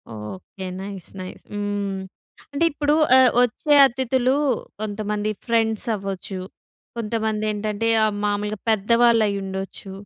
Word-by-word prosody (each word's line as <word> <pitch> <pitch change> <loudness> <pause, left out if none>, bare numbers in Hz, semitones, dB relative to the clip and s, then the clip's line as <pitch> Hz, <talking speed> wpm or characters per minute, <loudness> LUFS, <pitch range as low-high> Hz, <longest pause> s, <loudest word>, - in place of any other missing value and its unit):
Okay. 105 - -8 0.2
Nice, 195 -3 -8
nice 185 - -9
హ్మ్. 205 -1 -2 0.5
అంటే 285 - 0
ఇప్పుడు 295 +1 +1 0.2
ఆహ్, 255 -1 +6
వచ్చే 270 +5 +1
అతిథులు 260 0 0 0.5
కొంతమంది 210 0 -2 0.2
ఫ్రెండ్స్ 225 -2 +1
అవ్వచ్చు, 195 -1 -5 0.6
కొంతమంది 220 -1 -1
ఏంటంటే 210 +1 -2 0.2
ఆహ్, 215 - +2
మాములుగా 205 0 -1
పెద్దవాళ్ళు 230 +2 +4
అయ్యి 200 -1 -1
ఉండొచ్చు. 190 0 -6
210 Hz, 115 wpm, -23 LUFS, 200-230 Hz, 0.6 s, ఆహ్